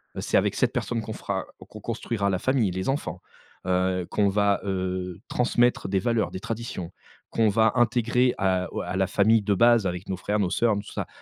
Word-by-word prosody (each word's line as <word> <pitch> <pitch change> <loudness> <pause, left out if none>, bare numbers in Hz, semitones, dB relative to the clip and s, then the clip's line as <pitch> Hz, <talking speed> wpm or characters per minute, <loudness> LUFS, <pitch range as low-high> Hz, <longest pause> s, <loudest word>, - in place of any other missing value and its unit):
Heu, - - -4
c'est - - +1
avec - - +1
cette - - +1
personne 115 -2 -2
qu'on 110 0 -6
fera 100 -2 -3
o - - -12
qu'on 110 - -11
construira 115 -3 -2
la 90 - 0
famille, 125 -4 +1
les 95 +6 -3
enfants, 95 - -2 0.5
heu, 90 -1 +1
qu'on 105 -1 +2
va, 100 0 +2
heu, 95 -2 -3
transmettre 120 0 +2
des 95 0 +1
valeurs, 115 +1 0
des - - -5
traditions, 110 -6 -5 0.4
qu'on 115 -1 +2
va 110 +2 +3
intégrer 120 +1 +2
à 95 -2 +1
o - - -2
à 95 - -4
la 95 - +2
famille 110 +3 +3
de 100 0 +1
base 115 -2 +4
avec 90 +1 -5
nos 95 - -2
frères, 105 +3 -1
nos 95 -3 +1
sœurs, 115 +2 +2
nos 100 - -2
tout - - -12
ça - - -3
100 Hz, 220 wpm, -25 LUFS, 95-115 Hz, 0.5 s, base